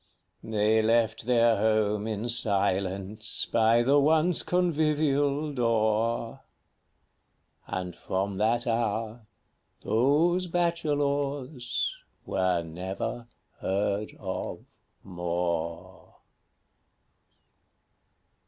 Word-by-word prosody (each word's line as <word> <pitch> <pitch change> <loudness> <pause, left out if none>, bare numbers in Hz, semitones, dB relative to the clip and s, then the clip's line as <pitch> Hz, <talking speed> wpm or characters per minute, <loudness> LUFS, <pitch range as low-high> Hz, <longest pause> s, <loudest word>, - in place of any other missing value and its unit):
They 110 0 +2
left 115 0 +1
their 115 -2 +4
home 105 0 +1
in 110 +1 -3
silence 100 -2 +1
by 115 +1 +3
the 140 +4 +4
once 160 +4 +3
convivial 150 -4 +1
door; 115 +1 0 1.3
And 90 -1 -4
from 95 +1 -3
that 120 +3 +1
hour 115 -1 -2 0.6
those 155 +10 +2
Bachelors 145 -6 -1 0.3
were 90 -2 0
never 95 +8 -5 0.3
heard 100 +2 -1
of 95 -2 -5 0.4
more. 85 -2 -4
115 Hz, 70 wpm, -27 LUFS, 100-140 Hz, 1.3 s, their